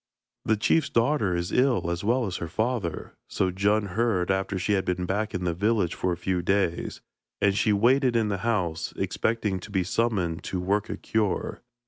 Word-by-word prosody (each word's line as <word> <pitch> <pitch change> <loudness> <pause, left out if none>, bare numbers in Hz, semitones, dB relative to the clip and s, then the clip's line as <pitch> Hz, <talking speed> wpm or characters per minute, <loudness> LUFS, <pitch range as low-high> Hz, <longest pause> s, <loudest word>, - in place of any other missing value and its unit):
'The 110 - +2
chief's 145 +7 +2
daughter 115 -7 +2
is 85 0 -2
ill 125 -9 +2
as 85 +2 -3
well 120 +4 +2
as 95 -3 -3
her 85 - -4
father,' 110 -3 -2 0.2
so 95 -1 0
Djun 100 +2 +1
heard 95 -3 +1
after 95 0 -1
she 95 +3 0
had 95 -1 +2
been 90 0 -1
back 105 +3 -2
in 90 - -2
the 85 -1 0
village 100 -1 +1
for 90 - -1
a 85 - -2
few 90 +1 -1
days, 95 -1 0 0.4
and 100 -1 +3
she 105 - +2
waited 125 +5 +3
in 115 -2 +2
the 100 -2 -2
house, 90 -7 -1
expecting 105 -4 -1
to 90 - -10
be 95 -3 0
summoned 95 -5 0
to 95 - -2
work 100 +3 0
a - - -4
cure. 110 -4 -1
100 Hz, 195 wpm, -26 LUFS, 90-110 Hz, 0.4 s, and